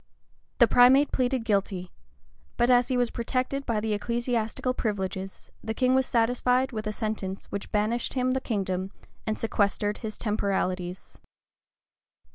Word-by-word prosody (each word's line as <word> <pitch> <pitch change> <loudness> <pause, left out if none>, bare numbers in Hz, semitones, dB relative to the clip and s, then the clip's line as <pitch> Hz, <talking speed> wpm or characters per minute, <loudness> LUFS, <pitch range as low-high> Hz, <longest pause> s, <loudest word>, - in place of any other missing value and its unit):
The - - +7
primate 265 +4 +6
pleaded 255 -2 0
guilty; 195 -4 -1 0.7
but 240 +1 +3
as 245 0 +5
he 255 - 0
was 245 -1 +1
protected 255 +3 -2
by 230 -3 +1
the 215 0 -1
ecclesiastical 235 +2 -1
privileges, 195 -4 -4
the 220 - -3
king 255 +1 +2
was 265 -1 +3
satisfied 250 +2 +2
with 215 -2 -4
a - - 0
sentence 210 -3 -4
which 200 - -5
banished 215 +5 0
him 255 0 +1
the 260 0 0
kingdom, 190 -5 -2 0.4
and 215 - 0
sequestered 205 -1 0
his 215 -2 -6
temporalities. 190 -4 -2
225 Hz, 140 wpm, -27 LUFS, 205-250 Hz, 0.7 s, The